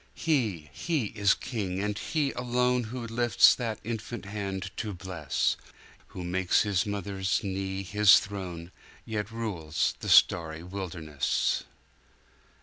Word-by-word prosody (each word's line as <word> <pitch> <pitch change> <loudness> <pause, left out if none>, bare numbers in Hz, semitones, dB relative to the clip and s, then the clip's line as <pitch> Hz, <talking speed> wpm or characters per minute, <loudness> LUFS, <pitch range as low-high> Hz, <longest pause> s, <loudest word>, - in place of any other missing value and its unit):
He, 105 - 0
He 155 -8 -1
is 100 -3 +4
King, 100 -7 -3
and 105 +1 -1
He 145 +5 -1
alone 125 0 +1
Who 120 +2 -5
lifts 120 +1 +5
that 115 -4 -3
infant 115 -1 -5
hand 100 -2 -4
to 105 -4 -3
bless; 85 -5 -1 0.5
Who 90 - -8
makes 90 +1 +2
His 100 -2 0
mother's 100 0 -1
knee 95 0 -3
His 105 +2 +6
throne, 90 -4 -6 0.3
Yet 105 -1 -3
rules 95 -9 -1
the - - -4
starry 80 -1 +4
wilderness. 90 -6 -2
100 Hz, 125 wpm, -28 LUFS, 90-115 Hz, 0.5 s, His